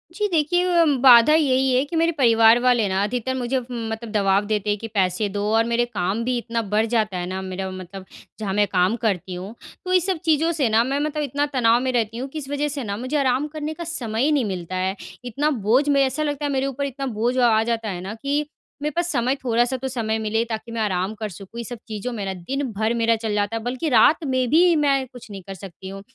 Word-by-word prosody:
जी। 420 +1 0
देखिए, 350 +2 +2 0.2
बाधा 250 +2 +8
यही 265 -4 +3
है 255 +1 +3
कि 295 - -6
मेरे 330 +1 +3
परिवार 230 -2 +5
वाले 245 -3 +3
ना 190 +1 0
अधिकतर 250 +4 -2
मुझे 260 +1 -1
म 240 -2 -6
मतलब 220 0 -6
दवाब 200 -1 +2
देते 210 -1 -1
हैं 205 - +1
कि 225 - -6
पैसे 190 0 +1
दो 205 +1 -3
और 225 - +4
मेरे 235 +1 +1
काम 210 -1 -2
भी 250 +1 0
इतना 230 -1 -2
बढ़ 215 +1 +3
जाता 215 -5 +1
है 175 - -3
ना 190 +1 -4
मेरा 190 0 -5
मतलब 185 +1 -9 0.3
जहाँ 200 -3 -3
मैं 205 +1 +3
काम 185 +3 +2
करती 190 -4 -1
हूँ। 185 +4 -7 0.3
तो 365 - -1
ये 365 - +6
सब 370 +1 -1
चीज़ों 320 +1 +3
से 290 -8 0
ना 220 +1 +4
मैं 270 +3 -1
मतलब 300 0 -2
इतना 285 +1 -1
तनाव 235 -2 +4
में 260 0 0
रहती 230 -2 -1
हूँ 260 +3 -4
कि 310 - -6
इस 275 -2 -8
वज़ह 285 +1 -1
से 285 -2 -4
ना 200 -2 -4
मुझे 255 +6 -2
आराम 270 +1 +1
करने 305 0 -5
का 340 - -7
समय 245 -9 -3
ही 300 - +3
नहीं 285 -5 +2
मिलता 185 -2 -5
है। 185 +1 -1 0.3
इतना 275 +6 0
बोझ 245 +3 +2
में 280 -1 +4
ऐसा 270 +3 -1
लगता 290 -1 -2
है 290 - -1
मेरे 270 -1 0
ऊपर 275 +1 -3
इतना 275 0 -5
बोझ 245 +3 +1
आ 235 -3 +4
जाता 225 -1 -2
है 180 -2 -5
ना 195 +3 -6
कि 280 +1 0 0.4
मेरे 300 +1 -1
पास 345 0 0
समय 255 0 +1
थोड़ा-सा 240 +1 +1
तो 265 +1 -4
समय 225 -4 -2
मिले 220 +1 0
ताकि 225 +1 -5
मैं 230 -1 -3
आराम 190 -1 -1
कर 215 -1 -3
सकूँ 195 +5 -10
ये - - -3
सब 240 +2 -7
चीज़ों 220 +2 -4
मेरा 200 -4 -3
दिन 260 +11 -4
भर 220 +3 0
मेरा 230 -1 +2
चल 220 -1 -3
जाता 205 +2 -1
है। 225 - -6
बल्कि 255 +6 -2
रात 295 +5 +5
में 255 -2 0
भी 340 +4 +5
मैं 280 -3 +2
कुछ 245 -3 -13
नहीं 195 -1 -7
कर 195 - -6
सकती 190 0 -10
हूँ। 195 0 -8
235 Hz, 250 wpm, -22 LUFS, 210-275 Hz, 0.4 s, बाधा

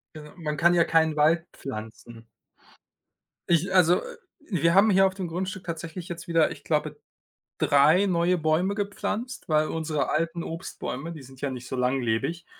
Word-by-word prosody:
Äh, 150 -1 -10
man 150 -3 -3
kann 175 +3 +4
ja 170 - +4
keinen 160 -1 +2
Wald 160 +3 +3
pflanzen. 115 -1 -9 1.2
Ich 175 +3 +2
also, 180 -1 +5
äh, 485 0 -9 0.3
wir 170 -2 +2
haben 205 +3 +6
hier 195 0 +5
auf 190 - -5
dem 190 -2 -4
Grundstück 185 +3 -4
tatsächlich 170 +1 -6
jetzt 170 +1 -7
wieder, 165 -2 +3
ich - - -10
glaube, - - -1 0.6
3 155 +8 +4
neue 180 -1 +2
Bäume 160 +5 +1
gepflanzt, 215 +4 -4
weil 155 -1 +3
unsere 160 -2 -2
alten 165 +2 -1
Obstbäume, 165 -2 -6
die 155 -4 -10
sind 130 0 -15
ja 140 - -2
nicht 125 -1 -7
so - - -6
langlebig, 130 +6 -1
165 Hz, 165 wpm, -26 LUFS, 150-180 Hz, 1.2 s, haben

